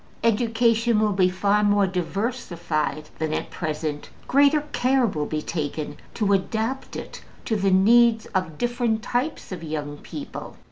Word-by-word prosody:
Education 230 0 +2
will 215 -1 +2
be 185 -1 +3
far 200 +3 +2
more 205 -1 +4
diversified 180 -5 -2
than 155 0 -1
at - - -4
present; 155 -2 -3 0.2
greater 285 +2 +4
care 260 0 +2
will 155 -9 -2
be 155 -1 -3
taken 150 -2 -3 0.2
to 205 -3 +2
adapt 220 +7 -1
it - - -7 0.2
to 225 - 0
the 195 -1 +2
needs 225 +4 +5
of 185 -5 -1
different 240 -2 0
types 245 +3 -2
of 180 -3 -5
young 150 -2 -4
people. 285 -1 -8
205 Hz, 145 wpm, -24 LUFS, 160-235 Hz, 0.2 s, needs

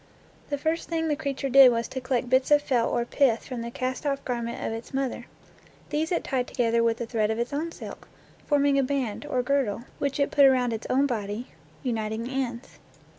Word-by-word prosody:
The 285 - -1
first 320 +3 -2
thing 325 -1 0
the 300 - +2
creature 280 -2 -3
did 270 -1 +8
was 230 0 -1
to 260 - -5
collect 255 -1 -1
bits 260 +1 +3
of 295 0 +5
felt 245 -5 +1
or 240 -1 0
pith 240 -3 +2
from 250 -3 -5
the 235 - -4
cast 255 +3 -3
off 275 -2 -2
garment 235 -2 -3
of - - -2
its 225 +3 -7
mother. 270 -2 -2 0.6
These 315 +3 -1
it 345 - 0
tied 255 -3 -1
together 235 -2 +1
with 230 0 +1
a - - -1
thread 220 -2 0
of 220 - -1
its 240 +3 -2
own 320 +4 -2
silk, - - -9 0.4
forming 285 -1 +3
a - - +3
band, 260 -5 -2
or 250 -1 0
girdle, 245 -5 0 0.2
which 280 0 -1
it 280 - +1
put 280 - +6
around 250 -3 +4
its 225 - -5
own 270 +2 +3
body, 220 -2 -3 0.3
uniting 220 -2 -2
the 245 - -6
ends. 250 -2 -4
255 Hz, 220 wpm, -26 LUFS, 235-280 Hz, 0.6 s, did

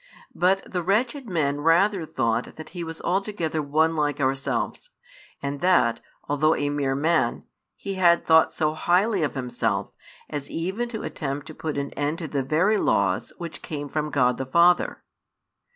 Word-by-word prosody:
But 190 +2 +2
the 180 - -3
wretched 235 - 0
men 145 -5 0
rather 170 +2 +3
thought 115 -3 -1
that 155 - -9
He 175 0 -6
was 165 0 -7
altogether 180 -4 -1
one 155 +3 +2
like 145 -2 0
ourselves, 135 - -1 0.5
and 140 0 -3
that, 175 -11 +3 0.3
although 150 +2 +2
a 145 - -1
mere 140 -2 0
man, 155 -3 +1 0.3
He 200 - -5
had 170 -1 +5
thought 160 0 +5
so 155 -1 0
highly 185 +5 +2
of 150 - -1
Himself 125 -2 -2 0.4
as 145 -2 -5
even 190 +9 -3
to 220 -2 -5
attempt 140 -1 -4
to 155 - -9
put 155 -1 -4
an 140 0 -3
end 145 +2 -2
to 165 - -5
the 140 -2 -1
very 165 +11 +2
laws 95 -2 +1
which 170 -2 -7
came 145 -2 -5
from 150 +1 -2
God 125 -4 +2
the 130 - -2
Father. 170 +5 +3
155 Hz, 170 wpm, -25 LUFS, 140-180 Hz, 0.5 s, had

